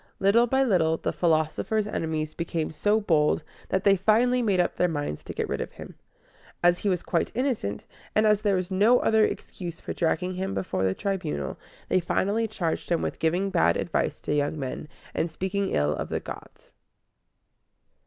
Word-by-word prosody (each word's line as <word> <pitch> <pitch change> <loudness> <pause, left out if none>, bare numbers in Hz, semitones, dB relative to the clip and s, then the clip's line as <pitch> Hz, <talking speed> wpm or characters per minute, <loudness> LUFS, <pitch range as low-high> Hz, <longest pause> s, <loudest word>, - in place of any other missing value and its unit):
Little 220 +5 +4
by 265 +3 +3
little 165 -9 +2
the - - -2
philosopher's 165 +6 +1
enemies 160 -6 -2
became 165 -1 -3
so 205 +7 +2
bold 160 -7 +2 0.3
that 190 0 0
they 200 -1 +6
finally 230 +6 +3
made 200 -6 +1
up 175 - +1
their 180 - +2
minds 145 - -3
to - - -7
get - - -2
rid - - -2
of - - -6
him. - - -10 0.7
As 175 0 +4
he 205 - 0
was 180 -3 0
quite 170 - 0
innocent, 245 - -1 0.3
and 215 - +4
as 210 -1 +4
there 205 -2 +2
was 185 0 -2
no 210 +6 +5
other 220 -1 +4
excuse 175 -5 -4
for - - -5
dragging 180 +2 0
him 190 +2 -3
before 165 - -2
the 95 0 +1
Tribunal, 75 - -3 0.3
they - - +3
finally 205 +6 0
charged 175 -6 -3
him 170 -1 +1
with - - -3
giving 180 +5 +1
bad 175 - +3
advice 155 -2 -1
to - - -2
young 145 +1 0
men, 135 +1 -5 0.3
and 170 - 0
speaking 190 +4 -2
ill 75 0 +1
of - - -4
the - - -1
gods. - - -11
185 Hz, 185 wpm, -26 LUFS, 160-205 Hz, 0.7 s, they